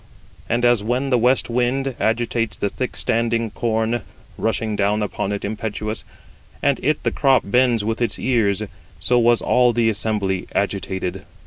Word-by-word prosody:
And 120 Hz, +1 st, +1 dB
as 120 Hz, -3 st, +4 dB
when 125 Hz, +5 st, -1 dB
the 125 Hz, -, +5 dB
west 125 Hz, +2 st, +3 dB
wind 125 Hz, +3 st, 0 dB
90 135 Hz, -3 st, -4 dB
agitates 115 Hz, -2 st, 0 dB
the 100 Hz, -, -1 dB
thick 130 Hz, +5 st, -4 dB
standing 115 Hz, -1 st, 0 dB
corn, 115 Hz, 0 st, 0 dB, 0.3 s
rushing 110 Hz, 0 st, -1 dB
down 105 Hz, +1 st, +1 dB
upon 100 Hz, -1 st, -3 dB
it 100 Hz, 0 st, -3 dB
impetuous, 110 Hz, +1 st, -4 dB, 0.6 s
and 140 Hz, -2 st, +2 dB
it 150 Hz, +2 st, 0 dB
[the -, -, +1 dB
crop] 135 Hz, -2 st, +3 dB
bends 120 Hz, 0 st, +2 dB
with 115 Hz, +2 st, -2 dB
its 115 Hz, -4 st, 0 dB
ears; 110 Hz, -5 st, +1 dB, 0.4 s
so 120 Hz, +7 st, +2 dB
was 120 Hz, 0 st, +3 dB
all 125 Hz, -1 st, +4 dB
the 115 Hz, -1 st, +2 dB
assembly 100 Hz, -3 st, -1 dB
agitated. 95 Hz, -2 st, -2 dB
115 Hz, 160 wpm, -21 LUFS, 105-120 Hz, 0.6 s, the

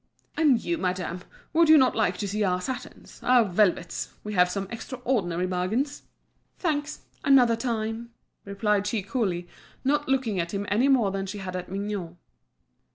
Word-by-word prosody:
"And 290 Hz, -7 st, +4 dB
you, 170 Hz, -1 st, -1 dB
madame, 180 Hz, -1 st, -2 dB, 0.3 s
would 330 Hz, 0 st, +4 dB
you 315 Hz, -, +9 dB
not 260 Hz, -3 st, +4 dB
like 220 Hz, -, +1 dB
to 205 Hz, -, -3 dB
see 210 Hz, +2 st, -1 dB
our 180 Hz, -2 st, +1 dB
satins, 250 Hz, +6 st, -7 dB
our 245 Hz, -2 st, +5 dB
velvets? 185 Hz, -3 st, +1 dB
We 210 Hz, -, -5 dB
have 180 Hz, -2 st, +4 dB
some 195 Hz, +1 st, -3 dB
extraordinary 230 Hz, -8 st, -2 dB
bargains." 185 Hz, +11 st, -1 dB, 0.6 s
"Thanks, 305 Hz, -3 st, -2 dB, 0.2 s
another 255 Hz, -5 st, +5 dB
time," 230 Hz, -1 st, -3 dB, 0.3 s
replied 200 Hz, 0 st, 0 dB
she 210 Hz, -2 st, -1 dB
coolly, 190 Hz, -5 st, -2 dB, 0.4 s
not 290 Hz, +1 st, +1 dB
looking 250 Hz, -8 st, +1 dB
at 170 Hz, +3 st, -2 dB
him 200 Hz, +1 st, -2 dB
any 235 Hz, +6 st, +3 dB
more 245 Hz, -8 st, +3 dB
than 195 Hz, 0 st, -3 dB
she 190 Hz, -, -5 dB
had 185 Hz, -2 st, -5 dB
at 180 Hz, 0 st, -5 dB
Mignot. 195 Hz, -3 st, -4 dB
210 Hz, 160 wpm, -26 LUFS, 185-255 Hz, 0.6 s, you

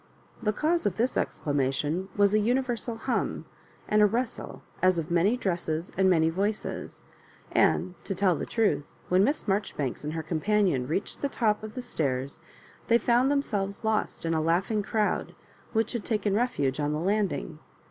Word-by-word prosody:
The 210 Hz, -, +1 dB
cause 315 Hz, +6 st, +1 dB
of 185 Hz, -, -2 dB
this 245 Hz, +3 st, +1 dB
exclamation 145 Hz, +5 st, -1 dB
was 205 Hz, 0 st, +4 dB
a 215 Hz, -, +5 dB
uni 245 Hz, +5 st, +2 dB
versal 235 Hz, -2 st, -3 dB
hum 260 Hz, -, -1 dB, 0.4 s
and 210 Hz, -1 st, +4 dB
rustle 240 Hz, 0 st, -3 dB, 0.2 s
as 185 Hz, -1 st, +4 dB
of 165 Hz, +1 st, -3 dB
many 185 Hz, +8 st, +3 dB
dresses 170 Hz, -5 st, -2 dB
and 190 Hz, 0 st, +4 dB
many 160 Hz, -3 st, +4 dB
voices; 200 Hz, +5 st, -3 dB, 0.5 s
and, 185 Hz, -, +2 dB
to 195 Hz, -, -2 dB
tell 185 Hz, -2 st, +3 dB
the -, -, -4 dB
trath, 180 Hz, -11 st, +1 dB, 0.2 s
when 185 Hz, +2 st, +4 dB
Miss 285 Hz, +3 st, 0 dB
Marjoribanks 190 Hz, -, -1 dB
and 150 Hz, +1 st, -3 dB
her 160 Hz, -1 st, -3 dB
companion 165 Hz, -4 st, +1 dB
reached 165 Hz, +7 st, -3 dB
the 280 Hz, -, 0 dB
top 215 Hz, -5 st, +1 dB
of 215 Hz, 0 st, -8 dB
the 250 Hz, -, -4 dB
stairs, 140 Hz, -, -2 dB, 0.5 s
they 235 Hz, -, +5 dB
found 245 Hz, +2 st, +3 dB
themselves 205 Hz, -9 st, -1 dB
lost 220 Hz, -5 st, -1 dB
in 165 Hz, -, +1 dB
a 160 Hz, -, +1 dB
laughing 180 Hz, +7 st, +1 dB
crowd, 210 Hz, 0 st, -1 dB, 0.4 s
which 225 Hz, 0 st, +1 dB
had 235 Hz, -4 st, -3 dB
taken 210 Hz, -3 st, 0 dB
refuge 155 Hz, -, 0 dB
on 145 Hz, 0 st, 0 dB
the 150 Hz, -, -1 dB
landing. 195 Hz, -, -1 dB
200 Hz, 170 wpm, -28 LUFS, 160-220 Hz, 0.5 s, a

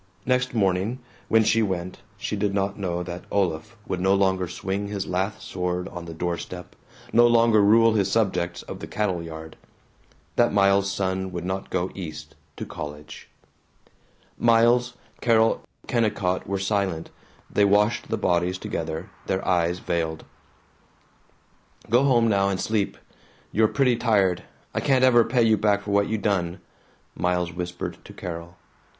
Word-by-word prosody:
Next 125 Hz, -1 st, +1 dB
morning, 100 Hz, +3 st, +1 dB, 0.3 s
when 115 Hz, 0 st, +4 dB
she 115 Hz, +1 st, +3 dB
went, 95 Hz, -3 st, -2 dB, 0.2 s
she 100 Hz, -, -3 dB
did 100 Hz, -1 st, -1 dB
not 100 Hz, 0 st, 0 dB
know 90 Hz, -2 st, -2 dB
that 90 Hz, 0 st, -7 dB
Olaf 90 Hz, +1 st, -1 dB
would 90 Hz, -, -3 dB
no 95 Hz, +1 st, +4 dB
longer 95 Hz, -2 st, +1 dB
swing 95 Hz, +4 st, -3 dB
his 100 Hz, -1 st, -3 dB
lath 95 Hz, +3 st, -2 dB
sword 90 Hz, -1 st, -3 dB
on 85 Hz, -1 st, -8 dB
the 85 Hz, -, -7 dB
door 85 Hz, +1 st, -2 dB
step, 90 Hz, -1 st, -9 dB, 0.4 s
no 120 Hz, +1 st, +7 dB
longer 115 Hz, -2 st, +5 dB
rule 115 Hz, +2 st, +5 dB
his 100 Hz, -3 st, +1 dB
subjects 90 Hz, -5 st, 0 dB
of -, -, -8 dB
the -, -, -7 dB
cattle 95 Hz, -5 st, -1 dB
yard; 80 Hz, -1 st, -9 dB, 0.8 s
that 120 Hz, -, +4 dB
Miles's 100 Hz, 0 st, +3 dB
son 95 Hz, -1 st, -2 dB
would 85 Hz, -1 st, -5 dB
not 95 Hz, +1 st, -3 dB
go 90 Hz, 0 st, -1 dB
East 80 Hz, -5 st, -7 dB, 0.2 s
to -, -, -5 dB
college. 75 Hz, +1 st, -8 dB, 1.1 s
Miles, 120 Hz, +1 st, +4 dB, 0.3 s
Carol, 115 Hz, -1 st, +3 dB, 0.2 s
Kennicott 105 Hz, -6 st, 0 dB
were 100 Hz, +1 st, -1 dB
silent. 95 Hz, -4 st, -1 dB, 0.4 s
They 105 Hz, -, +2 dB
washed 105 Hz, +3 st, +3 dB
the 115 Hz, -, -1 dB
bodies 90 Hz, -2 st, +1 dB
together, 80 Hz, -3 st, -4 dB, 0.2 s
their 95 Hz, +1 st, -1 dB
eyes 85 Hz, -1 st, +2 dB
veiled. 80 Hz, -3 st, -2 dB, 1.7 s
"Go 125 Hz, +4 st, +5 dB
home 120 Hz, -4 st, +4 dB
now 100 Hz, -2 st, +2 dB
and 95 Hz, -1 st, -1 dB
sleep. 110 Hz, -3 st, -1 dB, 0.5 s
You're 110 Hz, +1 st, +4 dB
pretty 125 Hz, -1 st, +2 dB
tired. 100 Hz, -7 st, +2 dB, 0.3 s
I -, -, 0 dB
can't 130 Hz, -2 st, +2 dB
ever 120 Hz, -2 st, +6 dB
pay 120 Hz, +1 st, +2 dB
you 110 Hz, -1 st, +4 dB
back 100 Hz, -1 st, +2 dB
for 100 Hz, -, -4 dB
what 100 Hz, 0 st, +3 dB
you 110 Hz, -, 0 dB
done," 95 Hz, -3 st, -1 dB, 0.6 s
Miles 90 Hz, -1 st, 0 dB
whispered 90 Hz, 0 st, -5 dB
to -, -, -11 dB
Carol. 85 Hz, 0 st, -7 dB
100 Hz, 155 wpm, -25 LUFS, 90-110 Hz, 1.7 s, no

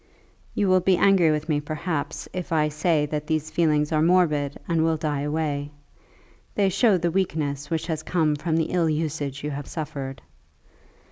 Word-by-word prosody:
"You 205 Hz, -, +1 dB
will 185 Hz, 0 st, +5 dB
be 185 Hz, 0 st, +3 dB
angry 190 Hz, -4 st, +5 dB
with 155 Hz, 0 st, -1 dB
me, 150 Hz, -2 st, +1 dB
perhaps, 155 Hz, 0 st, -4 dB
if 180 Hz, -1 st, -5 dB
I 155 Hz, -2 st, +2 dB
say 155 Hz, 0 st, +1 dB
that 150 Hz, 0 st, -4 dB
these 155 Hz, -1 st, -1 dB
feelings 150 Hz, -3 st, +2 dB
are 155 Hz, -1 st, +2 dB
morbid 155 Hz, -5 st, +2 dB
and 165 Hz, -2 st, +2 dB
will 160 Hz, -1 st, +2 dB
die 150 Hz, -2 st, -2 dB
away. 145 Hz, -1 st, -2 dB, 0.9 s
They 200 Hz, -2 st, +3 dB
show 205 Hz, +1 st, +3 dB
the 170 Hz, 0 st, 0 dB
weakness 145 Hz, -6 st, -1 dB
which 160 Hz, -1 st, -1 dB
has 160 Hz, -2 st, -2 dB
come 155 Hz, -2 st, +1 dB
from 160 Hz, +2 st, -1 dB
the 160 Hz, -, 0 dB
ill 170 Hz, -3 st, +2 dB
usage 150 Hz, -3 st, -2 dB
you 150 Hz, -, -2 dB
have 140 Hz, 0 st, -5 dB
suffered." 140 Hz, -5 st, -6 dB
155 Hz, 180 wpm, -24 LUFS, 150-170 Hz, 0.9 s, will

